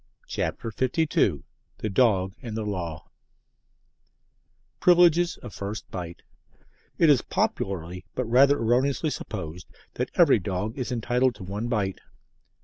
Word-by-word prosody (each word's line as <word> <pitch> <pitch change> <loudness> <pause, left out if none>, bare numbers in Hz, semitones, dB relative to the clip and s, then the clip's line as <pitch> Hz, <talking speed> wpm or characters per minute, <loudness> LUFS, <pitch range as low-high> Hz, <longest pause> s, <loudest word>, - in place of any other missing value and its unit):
CHAPTER 115 - -3
LII 130 - +1 0.3
THE 110 - -3
DOG 95 -4 +3
AND 115 -4 -5
THE 110 - -3
LAW 85 -6 -5 1.7
PRIVILEGES 175 -1 +5
OF 120 - -8
FIRST 100 0 -6
BITE 85 -2 -7 0.7
It 160 -3 +6
is 135 - +4
popularly, 90 -1 -2
but 130 - -1
rather 135 +5 +5
erroneously, 130 +6 +1
supposed 90 - -6 0.3
that - - -2
every - - +5
dog 100 +4 -3
is 130 -3 -4
entitled 125 +1 +1
to 100 - -10
one 100 +5 -4
bite. 105 -6 -1
110 Hz, 125 wpm, -26 LUFS, 95-130 Hz, 1.7 s, It